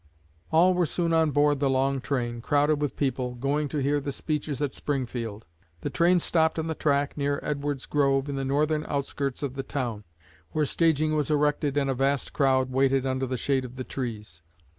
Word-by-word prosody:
All 175 +3 +5
were 180 -2 +1
soon 170 +1 0
on 160 -1 +4
board 145 0 +3
the 140 -1 +2
long 135 0 +1
train, 120 -4 -2
crowded 145 +3 +2
with 145 - -1
people, 125 -3 -1
going 140 +4 0
to 150 - -4
hear 145 +1 +1
the 140 0 -4
speeches 150 -1 -3
at 145 -2 -1
Springfield. 120 -6 -3 0.4
The 145 - -3
train 170 +7 +4
stopped 160 -1 +1
on 160 - -1
the 160 - -1
track, 145 -2 0
near 140 0 0
Edward's 145 -2 -2
Grove, 140 -1 +1
in 140 - -3
the 135 - -2
northern 150 +3 +1
outskirts 140 -1 -2
of 135 -3 -2
the 135 - -3
town, 125 -6 -4 0.5
where 155 -1 +2
staging 155 0 +2
was 150 -1 0
erected 145 -1 +1
and 140 -1 +2
a 135 - +1
vast 135 +1 0
crowd 130 -2 +2
waited 135 0 +2
under 130 0 -1
the 130 0 -2
shade 135 +2 0
of 125 0 -8
the 130 - -4
trees. 105 -11 -6
140 Hz, 200 wpm, -27 LUFS, 130-150 Hz, 0.5 s, All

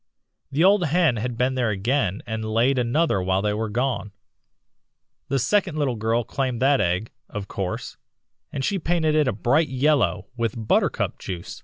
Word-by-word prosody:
The 145 +4 +2
old 195 -1 +5
hen 160 -5 +2
had 120 +2 -3
been 125 +2 +1
there 125 -3 0
again 105 0 0
and 110 -2 -4
laid 115 +5 +2
another 125 - +1
while 95 +1 0
they 105 0 +1
were 110 +1 -2
gone. 120 -3 -2 1.1
The 135 - 0
second 175 - +1
little 140 -4 +1
girl 115 +2 0
claimed 130 -1 -2
that 140 0 +4
egg, 90 +5 -1 0.2
of 105 -3 -6
course, 95 -2 -4 0.5
and 135 - -2
she 200 - 0
painted 160 -2 +1
it 150 -2 +3
a - - +2
bright 135 +9 +1
yellow 130 - +1
with 115 -3 -1
buttercup - - +1
juice. 90 -3 -6
125 Hz, 170 wpm, -24 LUFS, 110-145 Hz, 1.1 s, old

